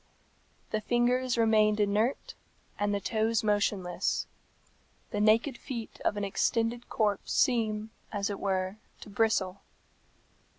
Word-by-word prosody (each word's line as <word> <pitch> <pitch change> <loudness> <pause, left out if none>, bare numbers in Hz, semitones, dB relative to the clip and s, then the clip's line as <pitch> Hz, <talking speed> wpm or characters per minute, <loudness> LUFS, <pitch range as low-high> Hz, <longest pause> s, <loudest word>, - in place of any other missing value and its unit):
The 215 - 0
fingers 245 +2 +1
remained 215 -2 +4
inert, 210 +5 0 0.5
and 205 0 +1
the 200 - 0
toes 220 +2 0
motionless. 205 -4 0 0.9
The 205 - -1
naked 225 +5 +3
feet 235 -5 -7
of 205 - +1
an 205 - -2
extended 230 +4 0
corpse 205 -3 0
seem, 220 -3 +1 0.2
as 200 -2 -1
it 200 - -5
were, 190 0 -1 0.2
to 210 - -10
bristle. 200 -3 +1
215 Hz, 120 wpm, -29 LUFS, 205-230 Hz, 0.9 s, remained